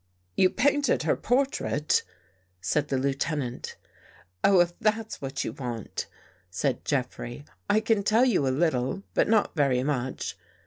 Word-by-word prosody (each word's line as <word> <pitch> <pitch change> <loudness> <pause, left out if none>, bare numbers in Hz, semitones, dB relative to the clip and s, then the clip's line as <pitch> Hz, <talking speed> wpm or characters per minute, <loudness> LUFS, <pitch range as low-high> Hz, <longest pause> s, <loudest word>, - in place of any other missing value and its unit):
" - - -42
You 185 - +5
painted 285 +5 +2
her - - +2
portrait," 245 - +1 0.6
said 120 +11 0
the 135 - 0
Lieutenant. 135 -1 -2 0.4
" 90 +1 -29
Oh, 195 -2 +6
if 175 0 +3
that's 220 -1 -1
what 135 0 -3
you - - -4
want," 120 -6 -5 0.4
said 125 +7 -1
Jeffrey,* 130 0 -3
" - - -44
I 210 +2 +4
can 220 -2 +2
tell 220 +5 +4
you 220 - +2
a - - +3
little, 135 +3 0
but - - +3
not 215 -4 +2
very 135 -4 +2
much. 130 -2 -3
145 Hz, 160 wpm, -27 LUFS, 130-215 Hz, 0.6 s, Oh